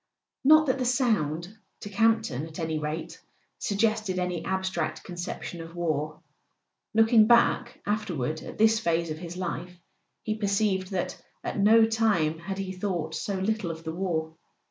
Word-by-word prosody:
Not 310 +3 +7
that 265 -1 +1
the - - +1
sound, 210 - 0 0.3
to 205 - -6
Camp 225 +2 +3
ton 145 - -4
at 160 - -11
any 160 -2 -2
rate, 155 +2 -5 0.4
sug¬ 200 - -2
gested 215 -3 +1
any 180 -2 -2
abstract 190 +1 -2
conception 175 -1 -6
of 165 +1 -10
war. 155 -2 -2 0.8
Looking 225 -1 +6
back 240 +1 +3
afterward 170 -9 -2
at - - -9
this 220 0 +4
phase 170 -4 0
of 155 - -5
his 175 0 -7
life 180 0 -4 0.4
he 215 - -1
perceived 200 -3 0
that 185 -3 -3 0.2
at - - -3
no 220 +3 +6
time 210 -9 +1
had 190 +3 -5
he 195 -1 -3
thought 180 -4 -3
so 200 - -2
little 195 0 -1
of 165 0 -6
the 160 - -4
war. 165 -3 -2
185 Hz, 165 wpm, -27 LUFS, 165-220 Hz, 0.8 s, Not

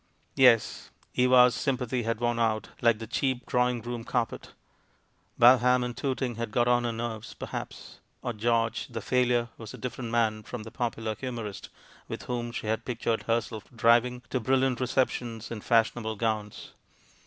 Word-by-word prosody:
Yes, 120 -5 +4 0.2
Eva's 125 -1 +5
sjTnpathy 125 -3 -1
had 115 -1 -1
worn 120 0 0
out, 110 -2 0
like 115 -2 +4
the 115 - -7
cheap 130 +2 -1
drawing 125 -2 +1
room 120 -1 -5
carpet. 120 0 -2 0.9
Balham 125 +1 +6
and 120 -1 -5
Toot 135 +1 -2
ing 120 -3 -2
had 115 -1 -3
got 120 +2 +1
on 120 0 +3
her 120 - 0
nerves, 115 -1 -5
perhaps; - - -7 0.2
or 120 - -2
George, 115 +1 0
the 115 -2 -5
failure, 120 +1 +1
was 110 -1 -8
a - - -11
different 125 -1 -5
man 110 -2 +1
from 110 +1 -7
the 110 - -10
popular 115 -3 -2
humorist 115 -3 -6 0.4
with - - -6
whom 120 -1 -3
she 115 - -5
had 110 +1 -1
pictured 115 -2 -1
herself 115 -2 -1
driving 120 +2 +3
to 130 - +1
brilliant 130 +1 +1
receptions 125 -3 -1
in 110 -2 -5
fashionable 115 -1 +1
gowns. 110 -1 -3
120 Hz, 165 wpm, -28 LUFS, 115-125 Hz, 0.9 s, Balham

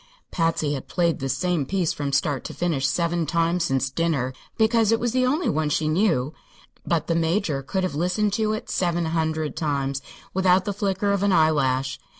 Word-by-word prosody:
Patsy 165 -3 0
had 135 - -5
played 170 -2 0
this 135 0 -2
same 180 -4 0
piece 175 +3 0
from 145 -3 -3
start 140 -1 0
to - - -6
finish 155 -6 0
seven 170 +3 0
times 170 +2 +1
since 135 -3 0
dinner, 140 -5 0 0.2
because 225 -1 +3
it 225 - +3
was 240 -1 0
the 255 +1 +2
only 300 +7 0
one 155 0 0
she 155 +1 0
knew; 155 -5 +1 0.5
but 165 -2 0
the 165 - 0
Major 165 -3 0
could 190 +8 -2
have 185 - -1
listened 180 +6 0
to 215 0 +1
it 215 - -5
seven 175 -2 0
hundred 160 -1 -1
times 140 -3 -1 0.3
without 185 0 +3
the 205 - -1
flicker 200 0 0
of 200 -1 0
an 200 0 +2
eyelash. 135 -6 +2
165 Hz, 190 wpm, -24 LUFS, 145-190 Hz, 0.5 s, because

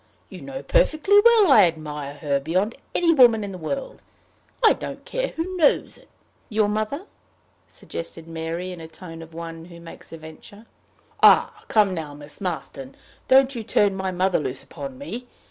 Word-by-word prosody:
You - - -10
know - - -7
perfectly 405 -4 +4
well 455 -8 +6
I 265 - +8
admire 150 -4 -4
her 145 -2 -1
beyond 185 +10 -1 0.2
any 335 -1 +4
woman 240 -7 +5
in 200 - -5
the 185 - -7
world. 280 - -5 0.6
I - - +7
don't - - -8
care - - -2
who 355 +3 -5
knows 310 -5 +2
it." - - -17 0.4
"Your 215 -2 +2
mother?" 215 - -2 0.6
suggested 165 -1 -8
Mary, 165 +2 -5
in 180 - -8
the 160 - -9
tone 165 0 -11
of 165 0 -13
one 165 -1 -7
who 170 -1 -13
makes 170 0 -13
a 165 - -8
venture. 160 +7 -13 0.6
"Ah, - - +5
come 210 -3 +3
now, 155 -4 -6
Miss 145 +4 -11
Marston! 145 -7 -5 0.3
Don't 265 +1 +5
you 235 - -4
turn 205 -2 +1
my 190 0 -2
mother 185 +1 +1
loose 130 -3 -4
upon 275 -2 -8
me. 250 -3 -7
185 Hz, 175 wpm, -23 LUFS, 165-265 Hz, 0.6 s, I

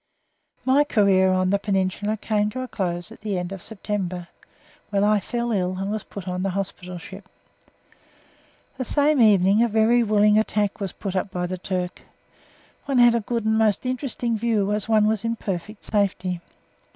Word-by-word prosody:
My 270 +3 +5
career 195 -8 +3
on 185 0 +1
the 200 - +2
Peninsula 200 +1 -1
came 210 0 0
to 255 +4 -5
a 255 - -4
close 175 -6 -3
at - - -13
the 205 -3 -2
end 180 +1 -4
of 195 -2 -7
September, 185 -5 -4 0.6
when 200 -1 +1
I 210 0 +4
fell 235 +4 -3
ill 185 -3 0
and 195 +2 -3
was 215 -1 -3
put 195 -2 -9
on 180 0 -2
the 195 - 0
hospital 185 -2 -5
ship. 190 +3 -11 1.5
The - - 0
same 290 +2 +2
evening 200 -1 +5
a 235 - +4
very 225 +2 +3
willing 210 -1 +4
attack 210 -1 0
was 195 -3 -3
put 195 -2 -6
up 190 +1 -1
by 180 -1 -3
the 185 +1 -4
Turk. 180 -1 -3 0.8
One 275 -2 0
had 240 -1 +7
a 235 - +2
good 230 0 -3
and 220 0 +2
most 215 +1 +2
interesting 250 -2 -2
view, 215 -3 0
as 210 +1 -3
one 215 -1 +4
was 215 0 +1
in 230 0 -1
perfect 200 0 -5
safety. 185 -4 -1
205 Hz, 185 wpm, -23 LUFS, 185-225 Hz, 1.5 s, had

